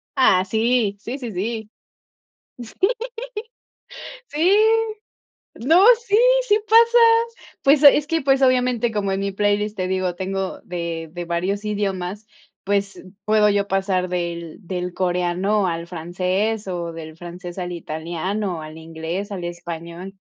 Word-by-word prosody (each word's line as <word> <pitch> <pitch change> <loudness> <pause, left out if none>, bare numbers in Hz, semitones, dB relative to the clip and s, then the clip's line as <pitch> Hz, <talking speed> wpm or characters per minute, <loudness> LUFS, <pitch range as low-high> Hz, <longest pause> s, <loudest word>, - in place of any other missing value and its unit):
Ah, 190 -8 +4
sí. 220 0 +1
Sí, 245 +6 -5
sí, 240 -5 -6
sí. 220 +3 -4 2.6
Sí, 330 +6 +2
sí 415 - +5 1.1
no, 335 +6 +6 0.2
sí, 405 - +3 0.3
sí 420 -1 +4
pasa. 465 +2 +6 0.7
Pues 280 +1 +5
es 290 0 +7
que, 325 -1 0
pues, 270 0 +2
obviamente, 250 -2 +2
como 205 -2 -1
en 195 - -1
mi 200 0 -1
playlist, 205 +1 0
te 185 -2 -2
digo, 185 -1 -1
tengo 190 +1 -4
de 170 -2 -5
de 175 +1 -6
varios 185 +5 -2
idiomas, 200 0 -3 0.4
pues 200 0 -1 0.2
puedo 210 -1 +4
yo 200 0 +1
pasar 190 -1 0
del 170 -2 -4
del 180 -1 -3
coreano 185 +3 0
al 170 0 -3
francés 185 +5 -2
o 175 -2 -3
del 160 -1 -9
francés 175 +1 -9
al 180 -1 -4
italiano, 170 +3 -4
al 155 0 -9
inglés, 165 +5 -5
al 185 -3 -5
español. 170 +2 -7
190 Hz, 135 wpm, -22 LUFS, 175-215 Hz, 2.6 s, es